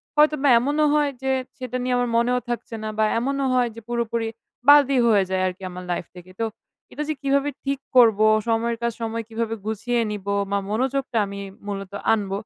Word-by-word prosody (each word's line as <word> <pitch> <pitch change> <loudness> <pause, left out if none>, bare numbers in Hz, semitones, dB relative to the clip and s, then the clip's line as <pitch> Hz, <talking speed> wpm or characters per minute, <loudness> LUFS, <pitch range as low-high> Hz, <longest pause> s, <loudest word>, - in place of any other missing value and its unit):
হয়তোবা 300 -1 +4
এমনও 290 +5 +1
হয় 295 -1 +2
যে 265 0 0 0.3
সেটা 255 -1 -4
নিয়ে 250 0 0
আমার 245 0 0
মনেও 245 +2 +2
থাকছে 240 -1 -4
না, - - -3
বা 220 - +3 0.2
এমনও 275 +3 -1
হয় 245 -1 +2
যে 230 - -9
পুরোপুরি 235 -1 -1 0.4
বাদই 280 -2 +6
হয়ে 210 -4 +4
যায় 190 0 0
আরকি 185 +1 -6
আমার 180 0 -8
লাইফ 175 - -2
থেকে। 180 +1 -12
তো 230 - +1 0.5
এটা 300 - -4
যে - - +1
কিভাবে 280 +1 +1
ঠিক 275 -1 -1 0.2
করবো? 220 -3 +6 0.2
সময়ের 230 +1 0
কাজ 235 - +1
সময় 230 0 -2
কিভাবে 225 0 -2
গুছিয়ে 225 +3 -1
নিব? 205 -2 -6 0.3
মা 200 - +2
মনোযোগটা 260 +2 -1
আমি 200 0 -7 0.3
মূলত 195 -2 -5 0.2
আনব? 205 -3 -1
235 Hz, 190 wpm, -23 LUFS, 215-270 Hz, 0.5 s, বাদই